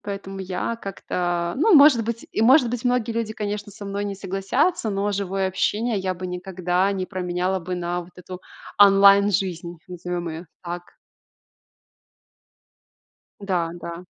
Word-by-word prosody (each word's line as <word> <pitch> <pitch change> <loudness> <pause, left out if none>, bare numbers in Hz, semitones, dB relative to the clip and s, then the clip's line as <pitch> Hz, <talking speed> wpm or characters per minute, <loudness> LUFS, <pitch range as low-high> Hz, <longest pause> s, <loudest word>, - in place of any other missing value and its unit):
Поэтому 195 -1 -6
я 190 +4 -3
как-то 175 -4 -3
ну, 360 +6 +5
может 280 -5 +7
быть, 230 +1 -4
и, - - -1
может 250 +2 +6
быть, 245 0 -4
многие 245 -2 +1
люди, 225 -1 -2
конечно, 205 -1 -4
со 205 +1 -10
мной 200 +1 -3
не 200 -1 -4
согласятся, 195 - 0
но 200 0 -1
живое 195 -1 -1
общение 210 +4 0
я 185 -1 -1
бы 185 +1 -6
никогда 180 +1 -1
не 190 -2 -2
променяла 185 0 -2
бы 180 +1 -4
на 175 0 -2
вот 175 +1 -14
эту 180 0 -10 0.4
онлайн-жизнь, 195 -3 +5
назовём 180 -1 -4
её 165 +2 -7 0.2
так. 175 0 -5 2.6
Да, 180 -5 -1
да. 170 0 -8
195 Hz, 145 wpm, -23 LUFS, 180-205 Hz, 2.6 s, может